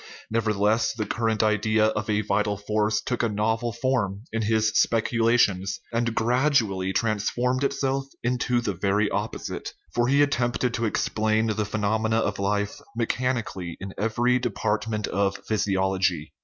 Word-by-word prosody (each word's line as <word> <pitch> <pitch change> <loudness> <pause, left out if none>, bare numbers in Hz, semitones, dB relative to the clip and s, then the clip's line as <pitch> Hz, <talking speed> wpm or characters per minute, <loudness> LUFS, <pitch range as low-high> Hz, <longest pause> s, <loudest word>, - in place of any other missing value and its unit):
Nevertheless, 110 0 +1
the 110 -2 -3
current 110 0 0
idea 110 0 +2
of 110 +1 -3
a 105 0 +2
vital 105 0 0
force 105 +1 0
took 125 - -1
a 115 - +1
novel 110 +3 0
form 115 -5 -1
in 115 - 0
his 110 0 +2
speculations, 115 -4 +2
and 115 0 0
gradually 115 -6 +2
trans 110 0 0
formed 125 +2 0
itself 135 -1 0 0.2
into 125 0 +1
the 105 -4 -2
very 100 +3 +1
opposite. 105 +2 -4 0.2
For 120 0 +2
he 140 +2 +4
attempted 125 -3 0
to 115 -1 -1
explain 110 0 +1
the 110 -1 -1
phenomena 110 +2 0
of 100 -3 -1
life 100 +1 -1 0.2
mechanically 115 -7 -2
in 95 +1 -7
every 120 +4 +1
department 110 -2 -1
of 100 +1 0
physiology. 95 -6 0
110 Hz, 140 wpm, -25 LUFS, 105-120 Hz, 0.2 s, he